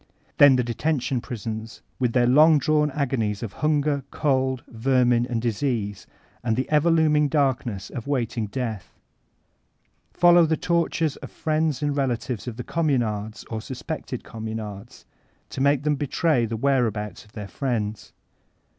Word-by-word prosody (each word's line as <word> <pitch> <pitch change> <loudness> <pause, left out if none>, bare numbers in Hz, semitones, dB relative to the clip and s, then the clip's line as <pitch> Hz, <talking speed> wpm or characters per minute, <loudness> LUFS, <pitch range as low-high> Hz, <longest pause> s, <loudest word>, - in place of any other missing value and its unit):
Then 145 -2 +8
the 125 - +2
detention 125 +1 -1
prisons, 110 -1 -6 0.2
with 125 -3 +1
their 125 -1 +4
long 150 +5 +6
drawn 150 +1 +2
agonies 125 -8 -1
of 105 -4 -5
hunger, 150 -2 0
cold, 130 -3 0
vermin, 120 0 +2
and 120 -2 -1
disease, 115 -3 -2 0.4
and 115 -2 +1
the 130 +2 -1
ever 150 +2 +4
looming 155 -2 +3
darkness 130 -9 -1
of 120 - -6
waiting 120 -5 -1
death. 110 -4 -5 1.1
Follow 175 -1 +5
the 160 0 +1
tor 170 +1 +1
tures 160 -3 -1
of - - -9
friends 155 -3 -1
and 145 -1 0
relatives 125 -4 -2
of 115 -2 -5
Communards 110 -10 -1
or 110 -1 -3
sus 125 +2 -8
pected 155 -6 -5
Communards, 110 -1 -7 0.5
to 135 - -4
make 140 0 +3
them 150 -1 +1
betray 145 -3 +1
the 115 0 -3
where 135 0 +2
abouts 105 -3 -5
of 105 - -23
their 105 -2 -6
friends. 110 -3 -3
130 Hz, 150 wpm, -24 LUFS, 110-145 Hz, 1.1 s, Then